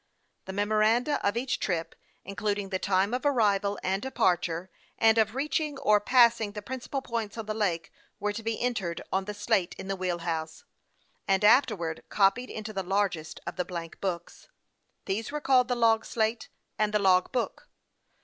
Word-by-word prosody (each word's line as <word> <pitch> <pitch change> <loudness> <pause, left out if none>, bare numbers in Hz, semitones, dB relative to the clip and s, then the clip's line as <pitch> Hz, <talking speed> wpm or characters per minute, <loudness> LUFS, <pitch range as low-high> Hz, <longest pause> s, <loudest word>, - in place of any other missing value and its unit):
The 190 - -6
memoranda 215 +7 +2
of 205 +3 +1
each 255 +2 -1
trip, 170 -4 -2 0.3
including 200 0 -2
the 190 -1 -1
time 195 +3 +1
of 250 - -1
arrival 205 -7 +2
and 190 +1 0
departure, 180 -7 0 0.3
and 225 0 +5
of 220 +1 +1
reaching 300 +1 -1
or 210 -6 +4
passing 235 -2 +4
the 210 -1 -7
prin 260 +4 -5
cipal 270 +2 -4
points 230 -3 -4
on 225 - -4
the 215 - -2
lake, 180 -6 -1 0.3
were 210 +1 -1
to 225 - -5
be 225 0 -2
entered 210 -9 -2
on 190 0 +1
the 210 +1 -5
slate 205 -3 0
in 190 - -7
the 195 - 0
wheel 180 -2 -2
house, 160 -2 -4 0.6
and 195 +1 +2
afterwards 210 - +3
copied 205 +5 +2
into 215 0 -6
the 195 - -2
largest 190 -4 -1
of - - -6
the 180 - +1
blank 170 -3 -7
books. 180 -3 -4 0.6
These 215 +6 -2
were 300 - -2
called 260 -4 +3
the 250 - 0
log 225 -2 +3
slate 225 0 -1 0.3
and 215 -1 +2
the - - +7
log 185 -3 +3
book. 255 - -3
210 Hz, 180 wpm, -28 LUFS, 190-235 Hz, 0.6 s, the